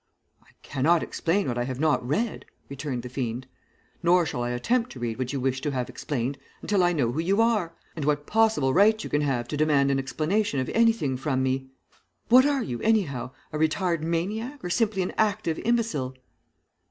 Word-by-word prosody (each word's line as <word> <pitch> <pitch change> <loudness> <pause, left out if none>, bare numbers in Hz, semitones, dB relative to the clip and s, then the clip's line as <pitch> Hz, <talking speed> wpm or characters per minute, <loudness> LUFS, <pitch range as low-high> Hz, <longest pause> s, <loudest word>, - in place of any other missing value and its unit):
"'I - - -28 0.2
cannot 155 +5 +2
explain 190 +4 0
what 120 -1 -1
I - - +1
have 130 0 -5
not 155 -4 +2
read,' 200 - -2 0.2
returned 135 -3 -4
the - - -5
fiend. 125 -1 -3 0.6
'Nor 175 0 +4
shall 125 -5 -3
I 120 - -1
attempt 230 - 0
to 130 - -10
read 120 0 -3
what 130 -1 -2
you 140 - -2
wish 130 0 -1
to 150 - -1
have 125 -3 -2
explained 130 +1 -3 0.2
until 205 -3 +2
I 175 - +4
know 135 -9 +1
who 140 - -3
you 190 +6 +1
are, 215 -8 +2 0.2
and 155 - -4
what 145 0 0
possible 215 -12 +2
right 215 +3 +4
you - - -7
can 145 - +2
have 130 -5 -1
to 150 - -3
demand 145 -2 +3
an 135 - +1
explanation 155 +5 0
of 130 - -2
anything 225 - +2
from 130 0 -1
me. 130 0 -1 0.6
What 255 +4 +7
are 280 -3 +1
you, 120 -2 -4
anyhow, 190 - +1 0.2
a 150 - -2
retired 165 +1 +1
maniac 210 - -2
or 175 - -3
simply 210 -3 +1
an 180 - -4
active 205 -6 +1
imbecile?' 220 - 0
155 Hz, 200 wpm, -26 LUFS, 130-205 Hz, 0.6 s, What